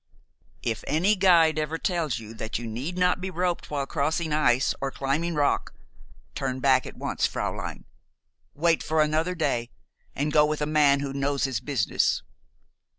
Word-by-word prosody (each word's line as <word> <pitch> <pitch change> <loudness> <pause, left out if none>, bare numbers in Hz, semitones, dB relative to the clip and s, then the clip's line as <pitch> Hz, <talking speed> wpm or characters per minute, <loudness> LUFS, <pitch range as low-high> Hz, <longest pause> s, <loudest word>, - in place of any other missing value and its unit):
"If 115 -2 -2
any 175 +9 +3
guide 170 -5 +4
ever 155 +1 -2
tells 165 - -1
you 110 -1 -9
that 110 0 -4
you 120 - -6
need 130 +11 -4
not 180 0 +2
be 190 - -3
roped 180 -1 -2
while 140 -2 -2
crossing 155 +3 -1
ice 135 -4 +3
or 135 - -1
climbing 145 +6 -1
rock, 145 -1 0 0.6
turn 130 -2 -3
back 130 -1 +3
at - - -10
once, - - 0
fräulein. - - -4 0.7
Wait 165 +2 +2
for 155 0 +2
another 160 +4 0
day, 120 -7 -1 0.5
and 150 +2 -1
go 150 - +6
with 150 0 0
a 150 - 0
man 145 -2 +3
who 140 -1 -4
knows 140 0 -1
his 130 -5 0
business. 135 -7 0
150 Hz, 165 wpm, -26 LUFS, 135-165 Hz, 0.7 s, go